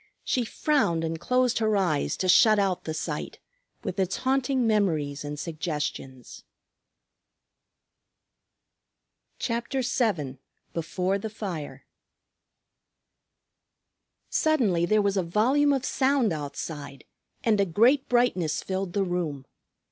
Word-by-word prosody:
She 250 -2 0
frowned 220 - +1
and 165 0 -3
closed 250 +5 +1
her 215 -2 +2
eyes 175 -7 0
to 185 - -1
shut 215 +4 +6
out 195 -3 0
the 160 - -3
sight 160 - -4 0.5
with - - -4
its 190 -1 0
haunting 260 -1 +1
memories 165 -9 +1
and 145 0 -5
suggestions 150 -6 -5 2.9
CHAPTER 235 +3 -2
VII 185 - -1 0.3
BEFORE 180 +4 -1
THE 220 - -5
FIRE 185 -9 -6 2.5
Suddenly 215 - +2
there 215 +1 +3
was 200 0 +1
a - - +3
volume 245 +12 +2
of 270 -1 0
sound 265 -7 +2
outside, 145 -1 -6 0.4
and 215 -3 +3
a - - +3
great 240 - +3
brightness 185 -11 +1
filled 190 -1 -3
the 200 - +1
room. 170 -7 -3
195 Hz, 110 wpm, -26 LUFS, 160-240 Hz, 2.9 s, shut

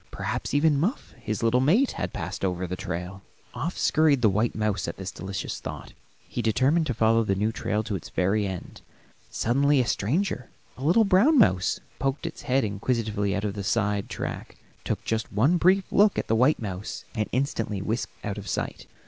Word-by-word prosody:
Perhaps - - -3
even 145 -1 +4
Muff, 205 - -1
his 110 +1 -3
little 115 +2 +3
mate, 205 - +3
had - - -4
passed - - -5
over 90 -1 -1
the 90 +1 -4
trail. 90 +1 -5 0.3
Off 170 +4 -3
scurried 150 -5 +3
the 110 - +5
white 110 +4 0
mouse 105 -3 -1
at 85 - -5
this 95 0 -5
delicious 95 +2 -5
thought; - - -8 0.3
he 120 - -3
determined 135 +9 +2
to 130 - 0
follow 115 +1 +3
the 100 -2 0
new 105 +3 0
trail 110 -1 -1
to 105 -2 -3
its 90 - -7
very 100 +3 +1
end. 95 -2 -7 0.5
Suddenly 140 +4 +2
a 125 - +2
stranger, 125 - -1 0.3
a 130 - -9
little 180 +9 +4
brown 205 +11 +5
mouse, 95 - +3 0.2
poked 135 +4 -1
its 165 - -5
head 135 +2 +1
inquisitively 105 -1 -1
out 100 - -2
of 105 -1 -2
a 100 - -4
side 105 -1 0
track, - - -5 0.3
took - - -3
just 110 -1 -2
one 135 - +3
brief 190 +3 +4
look 205 0 +4
at - - 0
the 115 - +2
white 130 +7 +4
mouse, 100 -2 -5
and 105 -1 -2
instantly 115 -6 -1
whisked 110 +5 -4
out 105 0 -3
of 100 - -9
sight. - - -3
115 Hz, 195 wpm, -26 LUFS, 100-145 Hz, 0.5 s, the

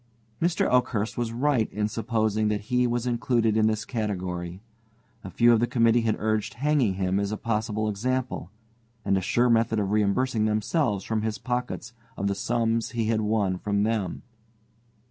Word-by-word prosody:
Mr. 170 0 +2
Oakhurst 120 -4 +1
was 120 -2 -2
right 125 -1 +1
in 105 +1 -1
supposing 110 -1 0
that 105 -1 0
he 125 +4 +1
was 120 0 -1
included 120 -2 +1
in 110 0 +4
this 110 0 -1
category. 90 -6 -3 0.6
A - - -7
few 120 0 +4
of 115 - +4
the 120 - +1
committee 115 -1 +3
had 115 -2 +1
urged 110 -1 -1
hanging 135 -6 +1
him 95 0 0
as 100 0 -1
a 110 - -2
possible 110 -1 -1
example, 125 -2 -2 0.6
and 100 -1 +2
a 95 - +1
sure 120 +6 +2
method 115 -1 +2
of 100 -2 0
reimbursing 110 +2 +1
themselves 110 - 0
from 110 -1 -1
his 110 -1 -2
pockets 125 0 -4 0.2
of 100 - -2
the 100 - +1
sums 115 +1 0
he 115 -2 -1
had 110 -1 +1
won 105 -4 0
from 100 0 0
them. 105 -5 -1
110 Hz, 175 wpm, -26 LUFS, 105-120 Hz, 0.6 s, in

